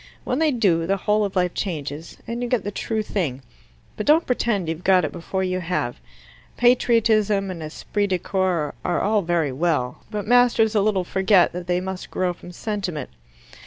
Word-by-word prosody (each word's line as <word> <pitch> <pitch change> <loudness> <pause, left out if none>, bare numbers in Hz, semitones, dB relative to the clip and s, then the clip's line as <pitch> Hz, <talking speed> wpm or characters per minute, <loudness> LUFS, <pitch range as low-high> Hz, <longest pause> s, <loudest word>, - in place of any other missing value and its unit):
When 250 - -1
they 320 -1 +3
do, 190 - +2
the 195 +1 +1
whole 210 +2 +1
of 200 - -5
life 180 -1 +1
changes, 155 -4 -5
and 235 +1 -4
you 245 - -2
get 245 -5 +1
the 205 - -3
true 220 +1 -2
thing. 145 -12 -3 0.5
But 210 - -5
don't 315 +3 +5
pretend 235 -7 0
you've 160 +2 -4
got 185 -3 +4
it - - -4
before 190 +2 -3
you 185 0 -1
have. 170 -9 -2 0.6
Patriotism 220 -5 +3
and 170 -3 -7
esprit 200 +6 -2
de 185 -2 +1
corps 180 -4 -1
are 175 - 0
all 210 0 +2
very 170 -5 0
well, 135 -3 -1
but 210 -2 -4
masters 240 -2 +4
a 210 - +3
little 195 -2 +1
forget 190 0 +3
that 180 0 -6
they 180 0 +1
must 190 0 -6
grow 180 -1 -1
from 175 +1 -12
sentiment. 180 - -4
190 Hz, 190 wpm, -23 LUFS, 175-215 Hz, 0.6 s, don't